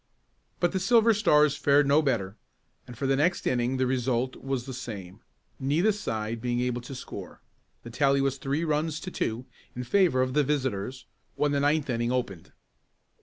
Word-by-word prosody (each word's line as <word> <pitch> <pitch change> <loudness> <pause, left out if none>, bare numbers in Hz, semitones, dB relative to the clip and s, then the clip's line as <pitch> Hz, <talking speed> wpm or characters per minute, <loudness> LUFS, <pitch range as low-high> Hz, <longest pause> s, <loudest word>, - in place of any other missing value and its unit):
But 175 - +2
the 190 - -1
Silver 225 +4 +4
Stars 150 -8 +4
fared 145 0 +3
no 140 +3 +4
better, 110 -9 -1 0.5
and 120 - -10
for 140 - -3
the 135 0 +2
next 165 +6 +1
inning 125 +1 0
the 130 - +1
result 130 0 0
was 135 -2 -4
the 135 - -6
same, 105 -6 -7 0.4
neither 150 +10 +2
side 115 - -4
being 120 0 -1
able 125 0 -1
to 130 +3 -8
score. 130 - -9 0.4
The 115 - -9
tally 140 +2 +2
was 135 0 0
three 140 +5 -1
runs 155 0 -1
to 185 - -6
two 115 -3 -3 0.3
in 125 - -4
favor 160 -3 +3
of 130 0 -3
the 150 - +3
visitors 130 -4 -2 0.3
when 150 -1 +1
the 140 - +1
ninth 145 +1 +1
inning 120 -1 -1
opened. 120 -10 -3
135 Hz, 180 wpm, -27 LUFS, 120-150 Hz, 0.5 s, Silver